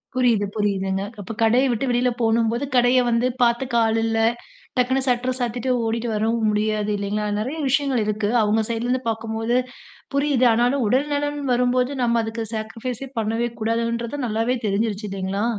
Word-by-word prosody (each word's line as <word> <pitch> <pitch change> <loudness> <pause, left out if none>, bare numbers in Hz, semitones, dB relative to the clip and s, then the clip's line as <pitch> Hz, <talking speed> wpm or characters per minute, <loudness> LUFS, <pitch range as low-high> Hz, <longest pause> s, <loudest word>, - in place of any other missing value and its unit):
புரியுது, 240 -5 +3
புரியுதுங்க. 195 -2 0 0.2
அப்ப 200 - -6
கடைய 235 +4 +4
விட்டு 235 +3 -1
வெளில 245 +1 +2
போணும்போது, 230 +3 +1
கடைய 245 +1 +5
வந்து 235 +1 +2
பாத்துக்க 240 +1 +2
ஆளில்ல. 225 0 +1 0.6
டக்குனு 260 +2 +2
சட்டர 250 0 +1
சாத்திட்டு 245 +1 -2 0.2
ஓடிட்டு 230 +1 -1
வரவும் 220 +1 +1
முடியாது 210 0 0
இல்லேங்களா! 205 +1 -2
நிறைய 260 +9 -3
விஷயங்கள் 270 -4 +1
இருக்கு. 210 0 -1
அவுங்க 215 +1 +2
சைட்ல 230 0 -2
இருந்து 250 +1 0
பார்க்கும்போது 225 +1 -2 0.6
புரியுது. 280 -3 +2
ஆனாலும் 245 +3 +2
உடல் 260 +7 +2
நலன் 290 0 -1
வரும்போது 250 +1 +2
நம்ம 235 -1 +2
அதுக்கு 225 +1 -4
சாக்ரிஃபைஸ் 225 +3 -5
சே - - -6
பண்ணவே 225 +2 -1
கூடாதுன்றது 235 +4 -1
நல்லாவே 225 +3 0
தெரிஞ்சுருச்சு 210 +1 -1
இல்லேங்களா! 195 +2 -2
230 Hz, 150 wpm, -22 LUFS, 220-250 Hz, 0.6 s, கடைய